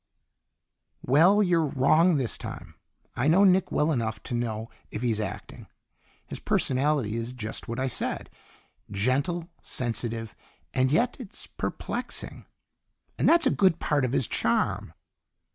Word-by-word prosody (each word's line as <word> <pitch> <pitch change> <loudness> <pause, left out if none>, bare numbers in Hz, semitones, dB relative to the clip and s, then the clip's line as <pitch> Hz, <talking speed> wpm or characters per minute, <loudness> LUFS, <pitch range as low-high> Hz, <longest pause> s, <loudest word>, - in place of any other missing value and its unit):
"Well, 175 +11 +5
you're 175 -3 +3
wrong 155 +6 +4
this 130 -4 -1
time. - - -8 0.4
I 125 +4 0
know 180 +6 +5
Nick 190 -1 +4
well 150 +2 +2
enough 115 -6 -2
to - - -6
know 115 -2 -3 0.2
if 105 - -5
he's 115 -3 +1
acting. 105 -3 -6 0.6
His - - -6
personality 135 -4 +1
is 115 +2 -3
just 110 -3 -5
what 115 +2 -4
I 130 - 0
said 130 - -3 0.6
gentle, 140 - -1
sensitive, 115 -2 -2 0.4
and 130 0 +2
yet 240 +11 +2
It's 230 -7 -6
perplexing, - - -4 0.7
and - - +4
that's 335 -1 +5
a 265 - +4
good 185 -4 +3
part 145 -4 0
of 125 - 0
his 130 -3 +1
charm." - - 0
130 Hz, 140 wpm, -27 LUFS, 115-170 Hz, 0.7 s, Well